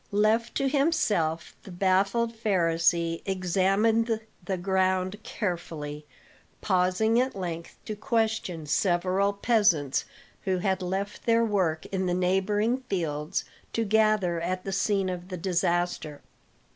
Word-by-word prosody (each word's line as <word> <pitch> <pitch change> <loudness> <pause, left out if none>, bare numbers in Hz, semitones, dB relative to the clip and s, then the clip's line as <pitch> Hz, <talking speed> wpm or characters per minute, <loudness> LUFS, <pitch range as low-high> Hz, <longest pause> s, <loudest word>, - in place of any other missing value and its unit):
Left 215 +3 +2
to 275 - +1
himself 215 - +1
the - - -13
baffled 195 +5 +1
Pharisee 170 -5 +1
examined 195 +5 +1 0.2
the 190 +1 -2
ground 190 +2 0
carefully, 160 -8 -4 0.5
pausing 190 +4 +2
at 260 +1 -2
length 170 -3 -5
to 215 - -4
question 220 - -1
several 185 +5 +1
peasants 200 - +2 0.4
who 190 -2 0
had 190 +1 0
left 195 +5 -4
their 230 0 +4
work 185 -7 0
in 190 -1 -1
the 175 - +1
neighboring 195 +6 +1
fields 160 -3 -2 0.3
to 230 - 0
gather 215 -5 +2
at 185 +2 -2
the 195 - -4
scene 195 0 +1
of 180 -1 -4
the 185 - -4
disaster. 175 -3 -1
190 Hz, 120 wpm, -27 LUFS, 175-215 Hz, 0.5 s, their